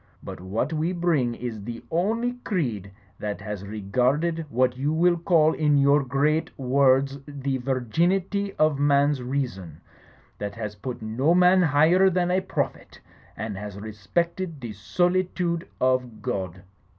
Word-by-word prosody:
But - - -8
what 110 - -2
we 160 +3 0
bring 160 -9 +1
is 115 -4 -6
the 115 +2 -7
only 225 +8 0
creed 120 - -2 0.3
that 105 -1 -4
has 105 -2 -6
regarded 130 - 0
what 125 0 +1
you 140 +4 -1
will 175 +2 +3
call 165 -2 +3
in 150 -2 +2
your 140 +1 +4
great 145 +5 +1
words 135 +1 +2
the 140 -2 -3
virginity 175 - 0
of 155 -2 +2
a - - -1
man's 145 -1 +3
reason, 125 - -4 0.6
that 100 -1 -4
has 105 -2 -5
put 110 +3 -7
no 130 +10 +1
man 180 +1 +5
higher 165 +4 +4
than 180 -1 0
a 185 +1 +2
prophet, 190 - -4 0.4
and 110 -2 -4
has 105 -1 -7
re 110 +1 -7
spected 170 - -2
the 120 -4 -6
solitude 175 - 0
of 125 -4 0
God.' 95 -7 -4
140 Hz, 150 wpm, -25 LUFS, 115-170 Hz, 0.6 s, man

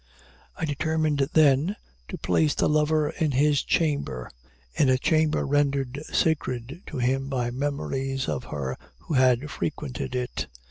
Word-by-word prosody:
I - - -1
determined, 155 -1 0
then, 155 +5 +4 0.3
to - - -6
place 155 -2 +1
the - - +2
lover 150 0 +2
in 155 -3 -1
his 145 +2 +3
chamber 140 - -1 0.4
in 140 - +3
a 130 - +4
chamber 155 +3 +2
rendered 140 -1 0
sacred 140 -1 0
to 155 - -6
him 135 +2 0
by 125 -3 -1
memories 135 0 -2
of 125 - -2
her 70 -3 -4 0.2
who - - -5
had 130 +1 +3
frequented 140 -4 -4
it. 125 -1 -3
140 Hz, 140 wpm, -26 LUFS, 130-150 Hz, 0.4 s, then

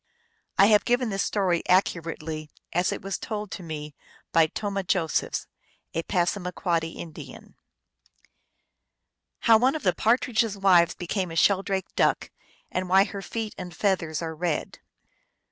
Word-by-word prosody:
I 195 - +7
have 210 -1 +5
given 245 0 +1
this 195 -1 -1
story 185 -5 +1
accurately 165 -4 0 0.2
as 180 +2 +2
it - - -5
was 195 0 -3
told 210 -2 -5
to - - -6
me 150 -3 -6 0.4
by 165 -1 +5
Tomah 200 +3 -3
Josephs, 170 -3 0 0.5
a 165 - 0
Passamaquoddy 175 -2 -1
Indian. 165 -3 -10 1.9
Hoiv 225 -1 +6
one 260 +4 +3
of 310 - -4
the 185 - +3
Partridge 235 0 +2
s 220 -3 -4
Wives 180 -3 +4
became 180 +1 -2
a 165 - -7
Sheldrake 195 +2 +1
Duck, - - +1 0.4
and 185 0 -2
why 190 +1 +6
her 200 -1 -6
Feet 220 +1 -4
and 180 -2 -7
Feathers 170 -6 0
are 160 -1 -3
Red. 165 0 -3
185 Hz, 145 wpm, -26 LUFS, 165-205 Hz, 1.9 s, I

